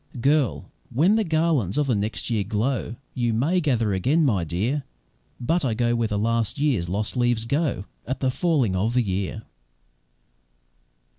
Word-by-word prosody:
Girl! 140 Hz, 0 st, +2 dB, 0.3 s
when 170 Hz, -, +3 dB
the 220 Hz, -, +2 dB
garlands 155 Hz, -, +1 dB
of 150 Hz, -1 st, +2 dB
next 105 Hz, +3 st, -2 dB
year 110 Hz, -3 st, +1 dB
glow, 110 Hz, +3 st, -1 dB, 0.2 s
YOU 120 Hz, -2 st, 0 dB
may 155 Hz, +11 st, +1 dB
gather 120 Hz, -, +1 dB
again, 140 Hz, -, +2 dB
my 100 Hz, -10 st, +2 dB
dear 105 Hz, -, -1 dB, 0.6 s
But 165 Hz, +8 st, +1 dB
I 120 Hz, -5 st, 0 dB
go 120 Hz, +1 st, +1 dB
where 115 Hz, -1 st, +1 dB
the 105 Hz, -, -2 dB
last 115 Hz, 0 st, 0 dB
year's 130 Hz, -, +1 dB
lost 105 Hz, +3 st, -2 dB
leaves 120 Hz, -2 st, +1 dB
go 140 Hz, -, -1 dB, 0.2 s
At 130 Hz, -, -2 dB
the 130 Hz, -1 st, +1 dB
falling 135 Hz, -, +1 dB
of 110 Hz, +6 st, 0 dB
the 125 Hz, -, +4 dB
year." 100 Hz, +2 st, -3 dB
120 Hz, 160 wpm, -24 LUFS, 105-145 Hz, 0.6 s, the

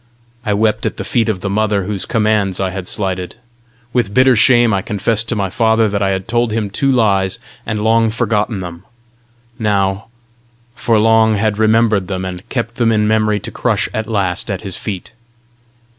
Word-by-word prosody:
I 105 Hz, -4 st, 0 dB
wept 110 Hz, 0 st, +1 dB
at -, -, -5 dB
the -, -, -4 dB
feet 115 Hz, -2 st, 0 dB
of 95 Hz, -4 st, -2 dB
the -, -, -3 dB
mother 105 Hz, -1 st, +1 dB
whose 100 Hz, 0 st, -4 dB
commands 105 Hz, -4 st, +1 dB
I 95 Hz, -1 st, -1 dB
had 95 Hz, -1 st, -6 dB
slighted; 95 Hz, -3 st, -3 dB, 0.6 s
with 115 Hz, -5 st, 0 dB
bitter 130 Hz, 0 st, +5 dB
shame 120 Hz, -1 st, +4 dB
I 95 Hz, -, +1 dB
confessed 110 Hz, +2 st, -1 dB
to 115 Hz, -, 0 dB
my 100 Hz, -3 st, -2 dB
father 110 Hz, -1 st, +2 dB
that 100 Hz, 0 st, -2 dB
I 100 Hz, -, +2 dB
had 95 Hz, -1 st, -2 dB
told 120 Hz, 0 st, +1 dB
him 105 Hz, -2 st, -2 dB
two 135 Hz, +6 st, +1 dB
lies, 100 Hz, -6 st, +2 dB, 0.3 s
and 110 Hz, -1 st, -2 dB
long 115 Hz, 0 st, +3 dB
forgotten 110 Hz, -2 st, -1 dB
them: 85 Hz, 0 st, -8 dB, 0.8 s
now 100 Hz, -2 st, 0 dB, 0.7 s
for 115 Hz, -1 st, +1 dB
long 110 Hz, 0 st, +4 dB
had 105 Hz, 0 st, 0 dB
remembered 110 Hz, -3 st, +3 dB
them, 95 Hz, -1 st, -3 dB
and 90 Hz, -1 st, -7 dB
kept 115 Hz, -2 st, -3 dB
them 115 Hz, -2 st, +2 dB
in 105 Hz, -1 st, +2 dB
memory 110 Hz, -1 st, +2 dB
to -, -, -7 dB
crush -, -, 0 dB
at 110 Hz, 0 st, -3 dB
last 100 Hz, -3 st, -1 dB
at 100 Hz, -2 st, -3 dB
his 95 Hz, -3 st, -4 dB
feet. 100 Hz, 0 st, -6 dB
105 Hz, 190 wpm, -16 LUFS, 95-115 Hz, 0.8 s, bitter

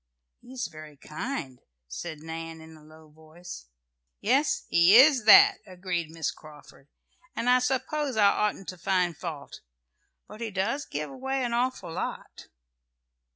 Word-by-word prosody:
"He 250 Hz, -, -15 dB
is 250 Hz, -3 st, -3 dB
very 155 Hz, -4 st, -11 dB
kind," 150 Hz, -, -6 dB, 0.3 s
said 155 Hz, -, -7 dB
Nan, 165 Hz, 0 st, -7 dB
in 160 Hz, 0 st, -13 dB
a 155 Hz, -, -17 dB
low 155 Hz, 0 st, -17 dB
voice. 160 Hz, -, -12 dB, 0.5 s
"Yes, 270 Hz, +7 st, +1 dB
he 170 Hz, +4 st, +5 dB
is 265 Hz, -3 st, +6 dB
that," 400 Hz, -, +8 dB
agreed 180 Hz, -3 st, -4 dB
Miss 160 Hz, -2 st, -3 dB
Carford, 150 Hz, -2 st, -16 dB, 0.5 s
"and 235 Hz, -, -3 dB
I 250 Hz, 0 st, +5 dB
suppose 265 Hz, +1 st, -2 dB
I 210 Hz, -, +5 dB
oughtn't 210 Hz, -2 st, -2 dB
to 185 Hz, -, -8 dB
find 180 Hz, -2 st, 0 dB
fault. 155 Hz, -3 st, -8 dB, 0.7 s
But 215 Hz, +2 st, -12 dB
he 230 Hz, -, -3 dB
does 215 Hz, +9 st, -2 dB
give 150 Hz, +1 st, -5 dB
away 265 Hz, 0 st, -3 dB
an 240 Hz, -1 st, -2 dB
awful 250 Hz, -6 st, -2 dB
lot." -, -, -6 dB
185 Hz, 150 wpm, -27 LUFS, 160-250 Hz, 0.7 s, that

